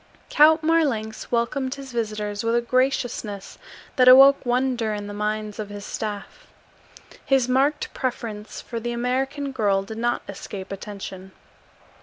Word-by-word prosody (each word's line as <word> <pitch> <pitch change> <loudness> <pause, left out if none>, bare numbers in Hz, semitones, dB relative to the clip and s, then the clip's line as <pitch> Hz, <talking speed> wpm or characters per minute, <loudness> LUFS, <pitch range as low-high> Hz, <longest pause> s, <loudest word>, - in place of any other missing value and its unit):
Count 315 +2 +6
Marlanx 275 -10 0
welcomed 255 +3 0
his 275 -2 -9
visitors 215 -3 -3
with 230 +1 +1
a 240 - +3
graciousness 240 -5 -1 0.4
that 255 -1 +5
awoke 270 +2 +8
wonder 245 -3 0
in 205 0 -5
the 205 - -7
minds 210 0 -3
of 210 -1 -4
his 205 0 -8
staff. 215 - -6 0.8
His 265 -3 +2
marked 275 +4 +1
preference 225 -5 -4
for 235 - -6
the 240 +1 -3
American 265 +4 -2
girl 205 -6 +1
did 220 +3 -8
not 240 +1 0
escape 195 0 -8
attention. 195 -1 -8
235 Hz, 140 wpm, -24 LUFS, 210-265 Hz, 0.8 s, awoke